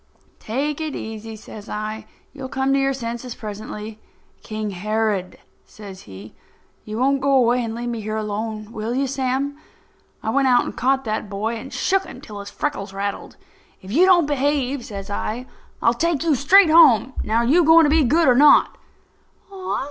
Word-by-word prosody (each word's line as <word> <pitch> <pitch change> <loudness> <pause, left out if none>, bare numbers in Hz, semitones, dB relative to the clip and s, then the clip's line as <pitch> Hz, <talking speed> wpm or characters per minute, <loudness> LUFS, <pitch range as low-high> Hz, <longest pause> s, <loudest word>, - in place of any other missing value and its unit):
"Take 280 +7 -3
it 310 -2 -4
easy," 220 0 -7
says 215 -1 -11
I. 215 +1 -5 0.3
"You'll 270 -2 -7
come 265 0 0
to 275 - +3
your 270 0 +1
senses 240 -1 -5
presently." 210 0 -8 0.4
"King 215 -1 -5
Herod," 210 0 -2 0.3
says 195 -3 -12
he. 100 +3 -11 0.5
"You 215 0 -6
won't 270 +2 +1
go 280 +1 +1
away 245 -1 +3
and 225 -1 -4
leave 240 +1 -4
me 230 -2 -4
here 215 +1 -4
alone, 215 0 -4
will 225 +1 -4
you, 275 +1 +1
Sam?" 270 +2 -2 0.6
I 220 - -1
went 270 +2 +2
out 245 -1 +4
and - - -6
caught 265 +1 +1
that 215 -1 -3
boy 215 +4 -3
and 265 +4 -8
shook 385 0 0
him - - -10
until 210 -2 -10
his 200 0 -8
freckles 205 -9 -4
rattled. 200 +1 -5 0.5
"If 190 - -9
you 345 - +4
don't 350 -4 +5
behave," 280 -2 -1
says 200 -2 -8
I, 225 +4 -3 0.4
"I'll 230 - +4
take 330 +3 0
you 325 -2 +2
straight 320 +6 +5
home. 270 -6 +6
Now, 220 +2 0
are - - 0
you 325 +8 +4
going 325 +1 +7
to 295 - +3
be 315 0 +4
good, 315 +6 +3
or 250 - +6
not?" 285 +3 +5
240 Hz, 185 wpm, -21 LUFS, 215-275 Hz, 0.6 s, going